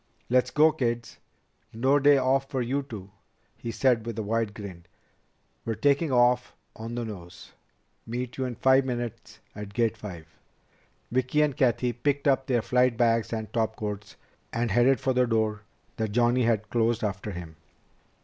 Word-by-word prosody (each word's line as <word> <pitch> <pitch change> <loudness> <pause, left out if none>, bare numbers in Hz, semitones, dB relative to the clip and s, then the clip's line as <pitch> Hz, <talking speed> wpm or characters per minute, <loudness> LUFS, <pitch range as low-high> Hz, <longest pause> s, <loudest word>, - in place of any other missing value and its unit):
"Let's 125 0 +3
go, 155 +1 +5
kids. 120 -4 -3 0.5
No 130 +6 +2
day 145 0 +6
off 135 +1 +1
for 130 - -2
you 135 +4 -1
two," 105 -8 -9 0.4
he 115 - -7
said 115 -1 +1
with 115 -2 -4
a 110 - -2
wide 110 0 -1
grin. 90 -5 -9 0.8
"We're 115 - -2
taking 140 +7 +2
off 125 0 +3 0.2
on 115 +1 -6
the 120 -1 -2
nose. 90 -5 -10 0.6
Meet 125 +2 -4
you 130 - -1
in 125 -1 -4
five 130 +2 +4
minutes 120 -3 -5 0.2
at 105 -1 -8
Gate 115 -2 +2
Five." 90 -7 -8 0.9
Vicki 130 +4 +2
and 145 -3 0
Cathy 125 -3 +1
picked 140 +4 -1
up 135 -1 +2
their 120 -4 +1
flight 125 -1 +2
bags 115 -2 +2
and 110 -2 -4
topcoats, 105 -2 -3 0.4
and 115 -1 -1
headed 120 +5 +4
for 130 - 0
the 125 0 +3
door 110 -2 0 0.4
that 110 -2 -2
Johnny 120 +1 +3
had 110 -2 0
closed 115 -1 +1
after 105 0 -3
him. 85 -4 -8
120 Hz, 165 wpm, -27 LUFS, 110-130 Hz, 0.9 s, day